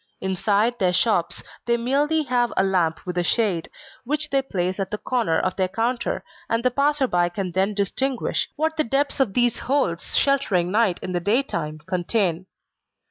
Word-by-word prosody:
Inside 205 Hz, +5 st, +1 dB
their 180 Hz, -2 st, +2 dB
shops, 180 Hz, -3 st, +1 dB, 0.2 s
they 235 Hz, 0 st, +3 dB
merely 290 Hz, +6 st, +1 dB
have 245 Hz, -3 st, +1 dB
a -, -, +4 dB
lamp 180 Hz, -4 st, 0 dB
with 180 Hz, -1 st, -2 dB
a -, -, +1 dB
shade, 190 Hz, -4 st, 0 dB, 0.3 s
which 300 Hz, +4 st, -2 dB
they 275 Hz, 0 st, +3 dB
place 185 Hz, -7 st, -2 dB
at 195 Hz, -, -2 dB
the 210 Hz, -, -3 dB
corner 230 Hz, -8 st, 0 dB
of 185 Hz, -, -1 dB
their 190 Hz, -1 st, +2 dB
counter, 235 Hz, +5 st, -1 dB, 0.3 s
and 230 Hz, +1 st, 0 dB
the 255 Hz, -, +3 dB
passer 280 Hz, +2 st, +2 dB
by 175 Hz, -7 st, +1 dB
can 180 Hz, +1 st, -4 dB
then 190 Hz, +4 st, 0 dB
distinguish 245 Hz, +6 st, -1 dB
what 315 Hz, +1 st, -1 dB
the 310 Hz, -, +3 dB
depths 275 Hz, +5 st, 0 dB
of 235 Hz, -8 st, +1 dB
these 240 Hz, -1 st, +2 dB
holes 255 Hz, -11 st, -1 dB
sheltering 200 Hz, -11 st, +2 dB
night 210 Hz, -4 st, +2 dB
in 185 Hz, -, -4 dB
the 175 Hz, -, 0 dB
daytime, 170 Hz, -, -1 dB
contain. 185 Hz, -1 st, -1 dB
215 Hz, 180 wpm, -23 LUFS, 185-255 Hz, 0.3 s, a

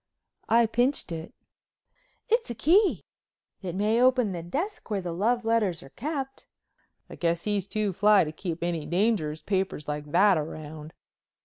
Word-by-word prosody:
I 235 Hz, +1 st, +5 dB
pinched 245 Hz, 0 st, 0 dB
it. 165 Hz, 0 st, -6 dB, 1.0 s
"It's 465 Hz, -, +1 dB
a 235 Hz, -, -4 dB
key. 360 Hz, -, +3 dB, 0.6 s
It 180 Hz, -3 st, -5 dB
may 215 Hz, +4 st, +2 dB
open 250 Hz, -4 st, +4 dB
the 175 Hz, -2 st, -4 dB
desk 300 Hz, -, -4 dB
where 205 Hz, -2 st, 0 dB
the 180 Hz, -2 st, -4 dB
love 225 Hz, +7 st, 0 dB
letters 215 Hz, -7 st, +1 dB
are -, -, -13 dB
kept." 270 Hz, -1 st, -5 dB, 0.6 s
"I -, -, -11 dB
guess 170 Hz, 0 st, -1 dB
he's 205 Hz, -2 st, -1 dB
too 210 Hz, -2 st, -1 dB
fly 205 Hz, +2 st, +5 dB
to 155 Hz, -, -4 dB
keep 170 Hz, +1 st, -5 dB
any 165 Hz, -3 st, -2 dB
dangerous 170 Hz, -4 st, 0 dB
papers 190 Hz, -6 st, -2 dB
like 150 Hz, 0 st, -4 dB
that 195 Hz, -2 st, +5 dB
around." 155 Hz, 0 st, -7 dB
200 Hz, 155 wpm, -27 LUFS, 165-235 Hz, 1.0 s, I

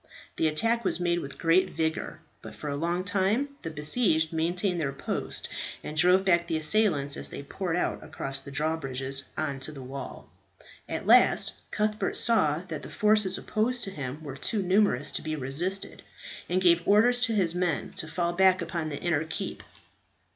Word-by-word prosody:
The 160 Hz, -, +2 dB
attack 230 Hz, +10 st, +1 dB
was 190 Hz, -, 0 dB
made 175 Hz, -1 st, +1 dB
with 140 Hz, -3 st, -8 dB
great 165 Hz, +3 st, +3 dB
vigour; 160 Hz, 0 st, -3 dB, 0.2 s
but -, -, -10 dB
for 150 Hz, -, -6 dB
a 140 Hz, -, -2 dB
long 170 Hz, +4 st, -1 dB
time 200 Hz, +8 st, +1 dB
the 165 Hz, -, -5 dB
besieged 160 Hz, +1 st, +1 dB
maintained 175 Hz, +2 st, -1 dB
their 140 Hz, -3 st, -1 dB
post, 140 Hz, -, -4 dB, 0.4 s
and 150 Hz, -, -6 dB
drove 180 Hz, +4 st, +4 dB
back 170 Hz, -2 st, +3 dB
the 160 Hz, -, -1 dB
assailants 155 Hz, -4 st, +3 dB
as -, -, +1 dB
they -, -, -7 dB
poured 175 Hz, +4 st, -3 dB
out 180 Hz, -, -1 dB
across 135 Hz, 0 st, -3 dB
the 135 Hz, -, -10 dB
drawbridges 135 Hz, -2 st, -1 dB
on 145 Hz, -3 st, -2 dB
to 135 Hz, +3 st, -4 dB
the 135 Hz, -3 st, -9 dB
wall. 135 Hz, +2 st, -8 dB, 0.6 s
At -, -, -4 dB
last -, -, +5 dB, 0.2 s
Cuthbert 215 Hz, +1 st, -1 dB
saw 165 Hz, -9 st, +3 dB
that 155 Hz, -4 st, -5 dB
the -, -, -9 dB
forces 210 Hz, -3 st, +2 dB
opposed 235 Hz, +3 st, -1 dB
to 195 Hz, -, -3 dB
him 145 Hz, -2 st, -6 dB
were 140 Hz, -3 st, -7 dB
too 210 Hz, -, 0 dB
numerous 185 Hz, -, +2 dB
to -, -, -2 dB
be 155 Hz, 0 st, -3 dB
resisted, 160 Hz, +8 st, -1 dB, 0.5 s
and 180 Hz, -, +1 dB
gave 170 Hz, -1 st, +5 dB
orders 230 Hz, +4 st, +5 dB
to 230 Hz, -3 st, +2 dB
his 180 Hz, -5 st, +2 dB
men 180 Hz, -3 st, -1 dB
to 155 Hz, -, -3 dB
fall 170 Hz, +1 st, -1 dB
back 185 Hz, +1 st, +4 dB
upon 165 Hz, -2 st, -3 dB
the 145 Hz, -, -5 dB
inner 160 Hz, -3 st, 0 dB
keep. 160 Hz, -, -4 dB
170 Hz, 185 wpm, -27 LUFS, 150-190 Hz, 0.6 s, last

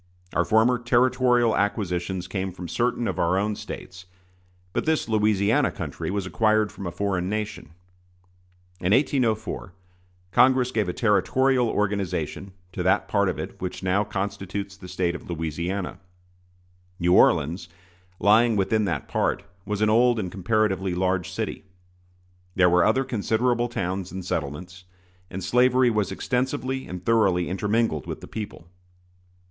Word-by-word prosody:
Our -, -, +2 dB
former 115 Hz, +3 st, +3 dB
territorial 125 Hz, -1 st, +3 dB
acquisitions 95 Hz, -3 st, -1 dB
came 95 Hz, -1 st, -3 dB
from 90 Hz, -1 st, -8 dB
certain 120 Hz, +3 st, 0 dB
of -, -, -3 dB
our 85 Hz, +2 st, +2 dB
own 105 Hz, +2 st, 0 dB
States; 95 Hz, -2 st, -9 dB, 0.7 s
but -, -, -2 dB
this 160 Hz, -1 st, +1 dB
Louisiana 105 Hz, -2 st, +2 dB
country -, -, -5 dB
was 100 Hz, -1 st, -2 dB
acquired 110 Hz, +1 st, +2 dB
from 100 Hz, -, -7 dB
a -, -, -3 dB
foreign 95 Hz, -1 st, -1 dB
nation. 105 Hz, -6 st, -4 dB, 1.0 s
In 90 Hz, +3 st, +1 dB
1804 115 Hz, -7 st, 0 dB, 0.6 s
Congress 130 Hz, +1 st, +4 dB
gave 105 Hz, -6 st, 0 dB
a -, -, -2 dB
territorial 125 Hz, +4 st, +2 dB
organization 100 Hz, -1 st, -2 dB, 0.2 s
to -, -, -4 dB
that -, -, +2 dB
part -, -, +2 dB
of -, -, -3 dB
it -, -, -7 dB
which 90 Hz, +1 st, -5 dB
now 95 Hz, +2 st, +2 dB
constitutes 100 Hz, -1 st, -4 dB
the 95 Hz, -2 st, -11 dB
State 90 Hz, -1 st, -1 dB
of 85 Hz, -, -9 dB
Louisiana. 85 Hz, +4 st, -3 dB, 1.0 s
New 90 Hz, 0 st, +3 dB
Orleans, 85 Hz, +1 st, +3 dB, 0.5 s
lying 110 Hz, +3 st, +4 dB
within 105 Hz, +2 st, +1 dB
that 85 Hz, -7 st, -2 dB
part, -, -, 0 dB, 0.2 s
was 105 Hz, 0 st, -2 dB
an 110 Hz, -, +3 dB
old 120 Hz, +2 st, +4 dB
and 95 Hz, -4 st, -3 dB
comparatively 95 Hz, -2 st, 0 dB
large 90 Hz, -1 st, 0 dB
city. -, -, -4 dB, 0.9 s
There 90 Hz, -1 st, +4 dB
were 90 Hz, -1 st, +5 dB
other 110 Hz, +7 st, +3 dB
considerable 120 Hz, +1 st, 0 dB
towns 95 Hz, -4 st, -3 dB
and 95 Hz, -1 st, -6 dB
settlements, 90 Hz, +3 st, -4 dB, 0.5 s
and 95 Hz, 0 st, -6 dB
slavery 125 Hz, +4 st, +4 dB
was 105 Hz, -3 st, 0 dB
extensively 130 Hz, +4 st, -2 dB
and 90 Hz, 0 st, -7 dB
thoroughly 95 Hz, -6 st, +3 dB
intermingled 105 Hz, -, 0 dB
with -, -, -6 dB
the -, -, -9 dB
people. 105 Hz, -6 st, -7 dB
100 Hz, 140 wpm, -25 LUFS, 90-115 Hz, 1.0 s, were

